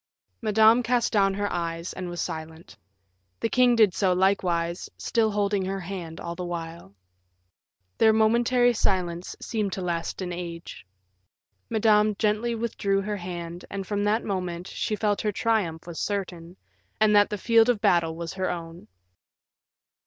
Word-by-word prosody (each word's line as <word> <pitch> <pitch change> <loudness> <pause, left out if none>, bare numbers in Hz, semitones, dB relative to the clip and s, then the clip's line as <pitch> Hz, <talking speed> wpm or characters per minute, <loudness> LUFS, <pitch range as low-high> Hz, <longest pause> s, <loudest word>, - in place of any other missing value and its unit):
Madame 220 +2 +5
cast 240 0 0
down 195 -2 +3
her 205 0 -1
eyes, 170 0 -3
and 185 -1 -5
was 175 0 -6
silent; 160 +1 -6 0.6
the 230 - -1
king 250 0 +4
did 215 -5 +5
so 185 -1 +2
likewise, 180 -2 0
still 225 -2 +1
holding 205 -1 0
her 195 +1 -3
hand 175 -3 -7
all 170 - -5
the 180 +1 -6
while. 165 - -6 1.0
Their 220 - +6
momentary 235 +3 +3
silence 180 -5 -1
seemed 210 -4 -2
to 190 - -4
last 170 -2 -3
an 180 -1 -4
age. 170 - -7 0.8
Madame 215 -1 +3
gently 220 +3 0
withdrew 205 -4 -1
her 205 +1 -3
hand, 175 -1 -6
and 195 -1 -5
from 205 +1 -2
that 215 +3 +1
moment, 180 -3 -3
she 215 - -3
felt 210 -1 0
her 210 - 0
triumph 200 -7 -1
was 170 -2 -7
certain, 180 -3 -4 0.4
and 215 -1 +4
that 205 0 +5
the 210 - -3
field 230 +3 +4
of 240 -4 +2
battle 170 -6 +2
was 165 +1 -5
her 190 -1 -2
own. 165 0 -7
195 Hz, 155 wpm, -26 LUFS, 175-215 Hz, 1.0 s, Their